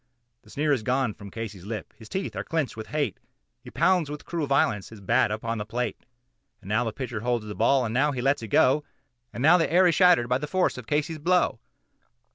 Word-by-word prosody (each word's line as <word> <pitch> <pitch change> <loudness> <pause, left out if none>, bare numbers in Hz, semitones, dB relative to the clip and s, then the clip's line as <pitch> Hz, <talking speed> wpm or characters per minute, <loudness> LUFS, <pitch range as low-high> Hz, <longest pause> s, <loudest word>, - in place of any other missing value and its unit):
The - - -21
sneer 150 +1 +1
is 130 - 0
gone 125 0 0
from 100 0 -11
Casey's 105 -3 -7
lip; 110 -1 -6
his 110 -2 -14
teeth 190 +1 -4
are - - -3
clenched 160 -5 -2
with 110 -1 -7
hate, 145 - -2 0.4
He - - -10
pounds 180 -5 +2
with 150 0 -7
cruel 165 -4 -3
violence 110 -7 +1
his 110 - -12
bat 115 +5 +2
upon 110 +1 -3
the - - -2
plate; 120 +4 -4 0.5
And 105 - -15
now 110 +4 +2
the 115 - -2
pitcher 125 -2 -5
holds 120 -1 -1
the 105 - -6
ball, 125 +4 +2
and 110 - -3
now 140 +4 +2
he 130 - -4
lets 135 +2 +1
it 110 - -6
go, 135 +8 +3 0.5
And 120 - -5
now 175 +4 +6
the 165 - 0
air 180 +2 +5
is 175 - +4
shattered 180 -9 +5
by 125 +1 +1
the 150 - -4
force 185 +3 +1
of 120 - -11
Casey's 155 +2 -1
blow. 175 -6 +2
125 Hz, 235 wpm, -26 LUFS, 110-150 Hz, 0.5 s, now